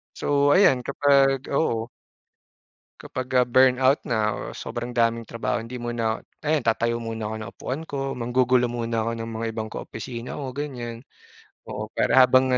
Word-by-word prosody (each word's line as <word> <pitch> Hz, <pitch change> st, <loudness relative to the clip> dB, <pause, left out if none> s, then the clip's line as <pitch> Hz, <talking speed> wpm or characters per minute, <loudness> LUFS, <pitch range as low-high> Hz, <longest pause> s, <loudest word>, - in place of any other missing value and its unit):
So 145 Hz, 0 st, +2 dB
ayan 135 Hz, -10 st, +5 dB
kapag 140 Hz, -1 st, +3 dB
oo. 120 Hz, -5 st, 0 dB, 1.1 s
Kapag, 130 Hz, 0 st, -5 dB
ah, -, -, +2 dB
burnout 130 Hz, +2 st, +4 dB
na 115 Hz, -5 st, 0 dB, 0.2 s
o -, -, -6 dB
sobrang 120 Hz, +1 st, -5 dB
daming 115 Hz, -1 st, +1 dB
trabaho, 115 Hz, +1 st, -2 dB
hindi 115 Hz, +2 st, -7 dB
muna 115 Hz, -2 st, -1 dB, 0.2 s
ayan, 155 Hz, -2 st, +2 dB
tatayo 115 Hz, +1 st, +1 dB
muna 115 Hz, -1 st, -4 dB
ako 110 Hz, -, -4 dB
ng 110 Hz, -, -6 dB
upuan 135 Hz, +7 st, -5 dB
ko, 140 Hz, -, -4 dB, 0.2 s
manggugulo 125 Hz, +1 st, +2 dB
muna 115 Hz, -1 st, -2 dB
ako 115 Hz, -, -1 dB
ng 115 Hz, 0 st, -5 dB
mga 115 Hz, +1 st, -3 dB
ibang 110 Hz, -1 st, -4 dB
kaopisina 120 Hz, +3 st, -6 dB
ko, 135 Hz, -3 st, -5 dB
ganyan. 120 Hz, -5 st, -5 dB, 0.7 s
Oo, -, -, -5 dB
para 130 Hz, -, +4 dB
habang 130 Hz, +1 st, +4 dB
nga 125 Hz, -, +4 dB
120 Hz, 160 wpm, -24 LUFS, 115-130 Hz, 1.1 s, ayan